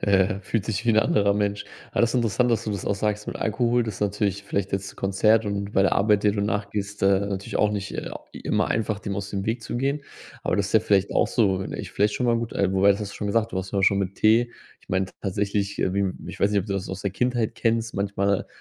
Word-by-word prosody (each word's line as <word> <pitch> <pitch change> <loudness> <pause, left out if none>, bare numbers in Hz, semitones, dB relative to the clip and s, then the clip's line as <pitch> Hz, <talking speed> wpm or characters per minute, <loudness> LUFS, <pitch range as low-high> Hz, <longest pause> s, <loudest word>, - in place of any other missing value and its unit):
Äh, 100 0 +2
fühlt 100 +1 -2
sich 110 +1 -2
wie 120 - +4
'n 110 - +4
anderer 100 -2 +3
Mensch, 100 0 -1 0.3
aber - - +1
das 115 0 +3
ist - - -5
interessant, 120 +1 +2
dass 115 0 +1
du 105 - -2
das 100 - -4
auch - - 0
sagst 105 +1 -2
mit - - -4
Alkohol, 120 +2 +1
das 110 - -4
ist - - -12
natürlich 100 -1 0
vielleicht 100 -1 -2
jetzt 95 0 -2
'n - - -25
Konzert 105 +3 +3
und 100 0 -3
bei 95 - +4
der 95 - +2
Arbeit, 105 +1 +3
der 105 - +4
du 105 - -2
nachgehst, 100 -1 -3
äh, 95 0 +4
natürlich 100 -1 -3
auch 105 - +3
nicht, 100 -1 -4
äh, - - -4 0.2
immer - - 0
einfach, 110 -2 -1
dem 100 -1 -4
aus 100 +1 -4
dem 100 0 -3
Weg 115 +1 -1
zu - - -4
gehen. 140 +3 -1 0.4
Aber - - 0
du - - -1
hast 95 - -5
ja 110 - +6
vielleicht 100 -2 +2
auch - - +3
so, 100 -6 +2
ne, 95 - -5
ist - - -6
vielleicht 105 +1 +1
schon 125 - 0
mal 120 -1 +3
gut, 115 -1 -3
äh, 95 -1 +1
wobei, 95 +1 +5
das 100 - +2
hast 105 -1 -5
du - - -11
schon 105 - -3
gesagt: 115 +2 +1
„Du 95 - -1
hast 95 0 -5
ja 100 - 0
auch - - +1
schon 100 - +4
mit 95 0 -2
Tee.” 115 +3 +4 0.3
Ich - - -26
meinte, 95 0 -1
tatsächlich, 100 +1 -1
äh, 95 - 0
wie 100 - +1
m 95 -2 -1
ich - - -8
weiß 100 - +3
nicht, 105 - +2
ob 95 - -7
du 100 - -2
das 95 -1 -3
aus 95 0 -5
der 100 -2 -2
Kindheit 120 -1 0
kennst, 115 0 0
manchmal 100 0 0
100 Hz, 285 wpm, -25 LUFS, 100-110 Hz, 0.4 s, ja